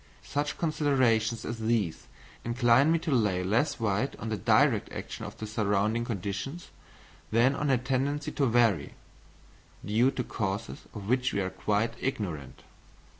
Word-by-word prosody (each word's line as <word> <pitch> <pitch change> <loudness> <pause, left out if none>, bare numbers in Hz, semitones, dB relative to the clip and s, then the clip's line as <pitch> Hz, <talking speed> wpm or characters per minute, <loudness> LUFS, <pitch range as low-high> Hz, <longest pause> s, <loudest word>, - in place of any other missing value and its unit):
Such 145 +1 -2
considerations 130 -8 +1
as 115 -1 -4
these 110 -7 -1 0.4
incline 120 +5 +4
me 165 - +4
to 160 -1 -3
lay 105 -8 +2
less 120 +11 +1
weight 110 +4 0
on 115 - -6
the 110 - 0
direct 100 - +3
action - - -6
of - - -8
the 110 - -5
surrounding 105 +2 0
conditions, 110 - -4 0.6
than 120 +4 +4
on 145 0 -1
a 130 - +4
tendency 140 +4 -1
to 140 -2 +1
vary, 115 -9 +2 0.9
due 110 +6 +3
to 130 -2 -3
causes 105 -1 -4
of 100 -2 -7
which 125 +2 +1
we - - 0
are 95 -1 -1
quite 105 +4 0
ignorant. 85 - -4
115 Hz, 150 wpm, -29 LUFS, 105-135 Hz, 0.9 s, incline